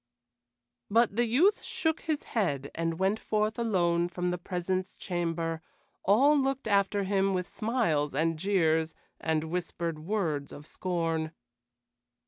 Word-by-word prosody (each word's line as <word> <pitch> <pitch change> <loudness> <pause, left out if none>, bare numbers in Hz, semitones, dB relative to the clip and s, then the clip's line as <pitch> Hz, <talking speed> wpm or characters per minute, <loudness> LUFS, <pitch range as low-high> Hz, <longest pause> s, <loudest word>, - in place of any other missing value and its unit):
But 230 0 +3
the 240 +1 +3
youth 335 - +3
shook 320 -1 -1
his 310 -3 -2
head 145 - -1
and 165 0 -2
went 195 +4 +1
forth 215 +2 0
alone 175 -6 +2
from 180 0 -2
the 180 - -3
presence 185 +1 -3
chamber; 165 -2 -2 0.4
all 265 +10 +5
looked 270 -3 0
after 200 -1 +2
him, 195 0 +1
with 180 -1 -2
smiles 195 - 0
and 160 +2 +1
jeers 160 -4 +2 0.2
and 160 -1 0
whispered 170 -1 -3
words 160 -5 -2
of 145 - -10
scorn. 165 -3 -2
180 Hz, 130 wpm, -29 LUFS, 165-215 Hz, 0.4 s, all